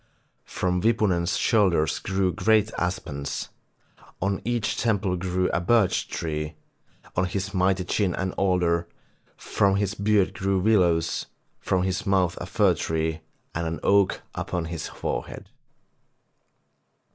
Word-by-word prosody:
From 90 Hz, -1 st, -1 dB
Wipunen's 100 Hz, -6 st, +2 dB
shoulders 90 Hz, -, +2 dB
grew 95 Hz, -2 st, 0 dB
great 110 Hz, +3 st, +3 dB
aspens, 75 Hz, -6 st, -3 dB, 0.7 s
on 100 Hz, +1 st, -1 dB
each 120 Hz, -2 st, -1 dB
temple 100 Hz, -5 st, 0 dB
grew 90 Hz, 0 st, 0 dB
a -, -, 0 dB
birch 105 Hz, +1 st, +2 dB
tree, 75 Hz, -1 st, -4 dB, 0.6 s
on 90 Hz, -, +2 dB
his 95 Hz, +1 st, -3 dB
mighty 95 Hz, 0 st, +2 dB
chin 90 Hz, 0 st, 0 dB
an 95 Hz, 0 st, -2 dB
alder, 90 Hz, -3 st, +1 dB, 0.5 s
from 100 Hz, -1 st, +1 dB
his 100 Hz, 0 st, 0 dB
beard 100 Hz, -2 st, +2 dB
grew 100 Hz, -3 st, 0 dB
willows, 90 Hz, -5 st, +2 dB, 0.3 s
from 95 Hz, -1 st, 0 dB
his 95 Hz, 0 st, -2 dB
mouth 95 Hz, -3 st, +2 dB
a 85 Hz, -, -5 dB
fir 100 Hz, -2 st, +3 dB
tree, 80 Hz, -1 st, -2 dB, 0.3 s
and 85 Hz, 0 st, -2 dB
an 80 Hz, 0 st, -3 dB
oak 100 Hz, -1 st, +3 dB
upon 90 Hz, -2 st, -3 dB
his 80 Hz, -2 st, -5 dB
forehead. -, -, -5 dB
95 Hz, 125 wpm, -25 LUFS, 85-100 Hz, 0.7 s, great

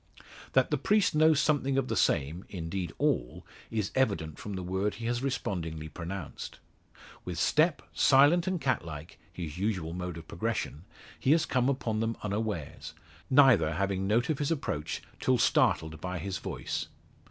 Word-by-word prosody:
That -, -, +3 dB
the -, -, +1 dB
priest 210 Hz, -2 st, +3 dB
knows 155 Hz, -1 st, +5 dB
something 140 Hz, -3 st, +2 dB
of 135 Hz, -2 st, +1 dB
the -, -, -1 dB
same, 80 Hz, +7 st, +1 dB
indeed 85 Hz, -1 st, -4 dB
all, -, -, 0 dB, 0.2 s
is 110 Hz, -4 st, -2 dB
evident 100 Hz, -, 0 dB
from 105 Hz, -, -6 dB
the 95 Hz, -1 st, -4 dB
word 95 Hz, +3 st, -1 dB
he 115 Hz, -, -7 dB
has 120 Hz, +1 st, 0 dB
respondingly 85 Hz, -, -3 dB
pronounced. 85 Hz, +2 st, -6 dB, 0.7 s
With 90 Hz, -2 st, -5 dB
step, 155 Hz, -, +2 dB
silent 145 Hz, +6 st, +5 dB
and 185 Hz, -2 st, 0 dB
cat 130 Hz, -2 st, 0 dB
like 80 Hz, -2 st, -9 dB
his 85 Hz, -1 st, -6 dB
usual 95 Hz, -6 st, -1 dB
mode 90 Hz, -1 st, -4 dB
of 80 Hz, -1 st, -10 dB
progression 95 Hz, -4 st, -3 dB, 0.3 s
he 135 Hz, -, +4 dB
has 165 Hz, -, +3 dB
come 125 Hz, 0 st, +1 dB
upon 115 Hz, -5 st, -1 dB
them 115 Hz, +1 st, -1 dB
unawares, 100 Hz, -7 st, -3 dB, 0.3 s
neither 130 Hz, -, +6 dB
having 95 Hz, +1 st, 0 dB
note 120 Hz, +8 st, +2 dB
of 150 Hz, -, -2 dB
his 145 Hz, -, 0 dB
approach 135 Hz, -, -2 dB, 0.2 s
till 130 Hz, -1 st, +2 dB
startled 80 Hz, -8 st, +2 dB
by 90 Hz, 0 st, -3 dB
his 95 Hz, +1 st, -4 dB
voice. -, -, -4 dB
100 Hz, 165 wpm, -30 LUFS, 85-130 Hz, 0.7 s, neither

